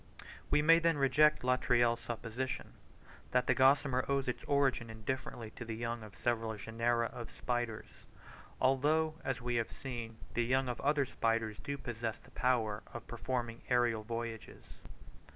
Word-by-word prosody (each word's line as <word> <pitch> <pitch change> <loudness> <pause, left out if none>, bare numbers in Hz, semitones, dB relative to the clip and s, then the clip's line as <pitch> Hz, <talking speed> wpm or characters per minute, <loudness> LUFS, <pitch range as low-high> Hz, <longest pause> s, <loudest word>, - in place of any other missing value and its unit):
We 150 - +3
may 165 +2 +7
then 165 -2 +2
reject 145 +2 +4
Latreille's 120 -2 +3
supposition, 120 +3 -4 0.6
that 125 0 +2
the - - +4
gossamer 135 -1 +4
owes 140 -1 +1
its 125 - -2
origin 135 -5 +2
indifferently 110 0 -4
to 120 - -8
the 115 -1 -5
young 115 0 -3
of 110 -2 -11
several 115 -2 0
genera 115 +3 0
of 120 -2 -7
spiders: 120 -3 -4 0.5
although, 155 +4 +2
as 130 -2 -2
we 120 -1 0
have 115 - -1
seen, 120 -4 -6 0.2
the 120 - +2
young 130 +2 +2
of 120 - -4
other 145 0 +2
spiders 115 -3 -1
do 140 0 -4
possess 115 -4 -4
the - - -20
power 115 -5 +1
of 120 -1 -7
performing 120 -1 -3
aerial 120 -3 +3
voyages. 115 0 -6
120 Hz, 150 wpm, -34 LUFS, 115-130 Hz, 0.6 s, may